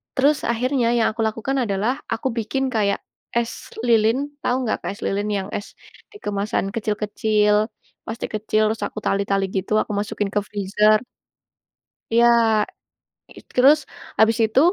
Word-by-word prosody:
Terus 285 +3 +4
akhirnya 250 +1 +1
yang 225 - +3
aku 230 - -3
lakukan 225 +5 -2
adalah 205 +4 0 0.2
aku 265 - -2
bikin 230 +5 -1
kayak 200 -2 +1 0.4
es 235 -1 0 0.3
lilin, 225 +1 +4 0.3
tau 245 - +1
nggak 225 - 0
Kak, - - -2
es 200 - -14
lilin 205 +2 -1
yang 190 - -4
es 205 - -4 0.4
di - - -12
kemasan 200 -1 -1
kecil-kecil, 210 -1 +1 0.5
plastik 225 +1 -5
kecil, 215 0 0
terus 220 +1 -2
aku 215 - -7
tali-tali 195 0 +1
gitu, 190 +2 -1
aku - - -5
masukin 205 0 -2
ke 210 - +3
freezer. 210 +1 +3 1.1
Iya. 235 +1 +5 1.1
It - - -13
terus 280 +5 +7 0.4
habis 220 +1 +5
itu, 220 +4 +2
215 Hz, 145 wpm, -22 LUFS, 205-235 Hz, 1.1 s, terus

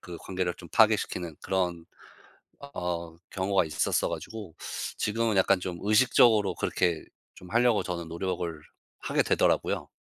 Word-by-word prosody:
그 90 -2 -9
관계를 90 -2 -3
좀 85 - -11
파괴시키는 100 -7 +2
그런 90 -3 -1 0.9
어 85 -2 -3 0.2
경우가 95 -2 +1
있었어 75 - 0
가지고 105 -7 -7 0.4
지금은 110 -1 0
약간 95 0 +4
좀 90 -1 -5
의식적으로 110 -1 +4
그렇게 85 -3 0 0.3
좀 90 - -13
하려고 120 -1 +3
저는 85 -2 -4
노력을 85 -2 -3 0.4
하게 - - +1
되더라고요. - - +1
95 Hz, 310 characters per minute, -28 LUFS, 85-105 Hz, 0.9 s, 약간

